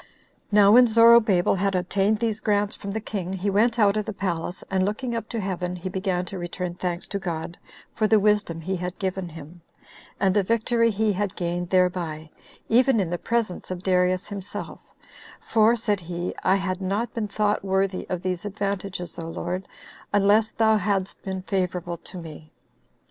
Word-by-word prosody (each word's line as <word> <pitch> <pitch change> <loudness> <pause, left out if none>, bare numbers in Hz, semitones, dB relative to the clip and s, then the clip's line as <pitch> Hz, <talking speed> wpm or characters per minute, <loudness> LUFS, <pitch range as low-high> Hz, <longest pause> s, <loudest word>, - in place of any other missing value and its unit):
9. 210 - +5
Now 200 - +7
when 245 +2 +8
Zorobabel 230 -5 +5
had 195 0 +1
obtained 195 +4 +1
these 220 -1 -1
grants 205 -1 0
from 200 - -7
the 210 +2 -2
king, 190 -4 -4
he 190 +2 -1
went 225 +4 +2
out 205 -3 +4
of 215 - 0
the 220 - -4
palace, 175 -2 -3
and 190 -1 +2
looking 220 +5 -2
up 230 -1 -4
to 230 - -3
heaven, 180 -2 -3
he 180 +1 -5
began 185 -1 -1
to 185 +1 -7
return 175 0 -4
thanks 175 -1 -3
to 200 - -2
God 170 -2 -4 0.4
for 215 - +1
the 220 0 +5
wisdom 205 -5 +1
he 190 +4 -2
had 180 +1 -5
given 190 -2 -3
him, 165 +2 -11 0.6
and 190 -1 +2
the 205 - +5
victory 230 +3 +2
he 215 0 +1
had 200 0 -2
gained 175 0 -2
thereby, 175 -4 0 0.4
even 250 +1 +4
in 180 -4 -1
the 175 - -2
presence 230 -6 -2
of 180 0 -5
Darius 180 0 +2
himself; 200 -1 -6 0.6
for, 225 +1 +3
said 210 -3 0
he, 175 0 -4
"I 190 - +4
had 190 -1 -2
not 200 +5 -2
been 220 -2 -2
thought 205 0 0
worthy 190 -1 -1
of 180 -2 -3
these 185 -2 -2
advantages, 195 -3 -4
O 165 0 -5
Lord, 180 +3 -4 0.4
unless 205 +2 +4
thou 220 -1 +3
hadst 195 -1 -1
been 190 -1 -5
favorable 180 -3 -2
to 180 - -10
me." 155 -2 -10
195 Hz, 185 wpm, -25 LUFS, 180-210 Hz, 0.6 s, when